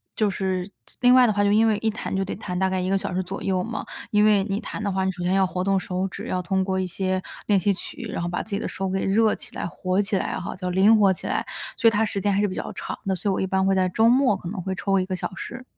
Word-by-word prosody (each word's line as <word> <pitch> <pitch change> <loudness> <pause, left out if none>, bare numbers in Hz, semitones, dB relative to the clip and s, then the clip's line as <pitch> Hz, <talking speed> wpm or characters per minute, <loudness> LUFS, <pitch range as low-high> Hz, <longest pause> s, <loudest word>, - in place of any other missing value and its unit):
就 215 -2 +2
是 190 -2 -2 0.2
就 - - -16
另 250 0 +6
外 255 -1 +7
的 215 - +2
话， 205 0 +1
就 200 - +3
因 220 +2 +4
为 215 -2 +2
一 225 - +1
弹 210 - -4
就 195 - 0
得 - - -4
弹 180 -3 -5
大 190 +1 +2
概 185 0 -1
1 185 0 -1
个 195 - +3
小 190 - -4
时 185 - 0
左 190 +2 -6
右 185 -2 0
嘛， 225 +1 -4 0.2
因 210 0 +4
为 205 -2 +4
你 200 0 -2
弹 210 - -6
的 200 - 0
话， 190 0 0
你 190 - +1
首 180 -1 -9
先 180 +1 +1
要 195 0 +4
活 180 0 -2
动 195 0 +2
手 185 +1 -2
指， - - -8
要 185 - -1
通 190 +2 0
过 190 0 -1
一 185 - -1
些 185 +1 -1 0.2
练 200 -2 +3
习 200 +3 +2
曲， 215 +4 -7
然 170 - -3
后 175 - -2
把 175 - -2
自 - - -10
己 200 - -1
的 - - -3
手 195 0 -3
给 190 0 -1
热 215 +3 +3
起 - - -10
来、 - - -3
活 185 +3 -1
起 200 -1 0
来 - - -2
哈， 175 - -5
就 185 -1 -4
灵 200 +5 +5
活 200 -2 +5
起 - - -7
来， - - -1 0.3
所 230 - +4
以 - - +7
它 220 0 +2
时 205 -2 -2
间 200 +1 +1
还 200 - +2
是 210 - +2
比 185 - -5
较 - - -4
长 - - -5
的。 190 -1 0
所 205 - -2
以 - - +2
我 - - -1
一 - - +1
般 190 0 +1
会 195 - +3
在 185 -1 +2
周 225 +5 +3
末 255 -3 +4
可 175 -2 -7
能 200 -1 -5
会 190 - -2
抽 195 +1 +1
1 185 - 0
个 185 0 -3
小 190 - -4
时。 255 +6 -7
195 Hz, 350 characters per minute, -24 LUFS, 185-210 Hz, 0.3 s, 外